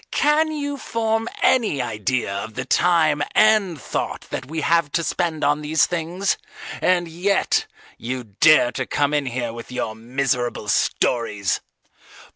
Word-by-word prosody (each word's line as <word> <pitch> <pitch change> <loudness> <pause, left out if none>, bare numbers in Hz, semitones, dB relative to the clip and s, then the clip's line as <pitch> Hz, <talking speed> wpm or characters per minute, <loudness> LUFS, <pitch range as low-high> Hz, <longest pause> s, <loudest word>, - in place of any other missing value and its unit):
Can 310 +2 +2
you 285 -2 -3
form 225 -1 -1
any 225 - +3
idea 115 -2 -2
of 110 +2 -5
the 130 - -3
time 160 -1 +3
and 215 -7 +4
thought - - -3
that - - -4
we 160 +2 -4
have 165 -2 +2
to 170 - +1
spend 165 -2 -1
on 145 +1 +2
these 155 +1 +2
things, 175 +3 -2 0.4
and 175 -1 +2
yet 180 +5 0 0.3
you 125 +2 -4
dare 120 +5 +4
to 130 +1 -4
come 145 0 0
in 145 -2 0
here 120 -2 -3
with 115 +1 -9
your 110 -3 -3
miserable 120 -1 -2
stories. 105 -3 0
150 Hz, 145 wpm, -22 LUFS, 120-180 Hz, 0.4 s, and